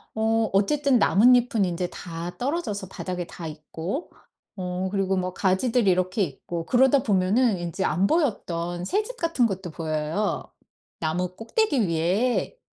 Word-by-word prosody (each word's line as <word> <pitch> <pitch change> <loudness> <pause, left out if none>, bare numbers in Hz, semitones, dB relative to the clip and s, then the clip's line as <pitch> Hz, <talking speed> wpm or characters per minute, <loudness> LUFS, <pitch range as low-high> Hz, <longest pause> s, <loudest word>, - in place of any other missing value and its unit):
어 225 0 +1
어쨌든 270 +5 +3
나뭇잎은 235 -1 +4
인제 180 0 -2
다 170 0 -7
떨어져서 245 - -2
바닥에 180 -2 -4
다 165 0 -8
있고 160 - -5 0.4
어 185 0 -3
그리고 195 -1 0
뭐 185 0 -2
가지들이 205 +3 +2
이렇게 185 +3 +1
있고 165 +2 -5
그러다 265 +2 +4
보면은 205 +2 +2
인제 175 +2 -3
안 175 +6 +2
보였던 175 - -1
새집 430 - -1
같은 330 -7 +1
것도 190 -4 -5
보여요. 155 +5 -2 0.6
나무 180 +3 -2
꼭대기 265 - +1
위에. 190 - 0
190 Hz, 295 characters per minute, -25 LUFS, 175-245 Hz, 0.6 s, 나뭇잎은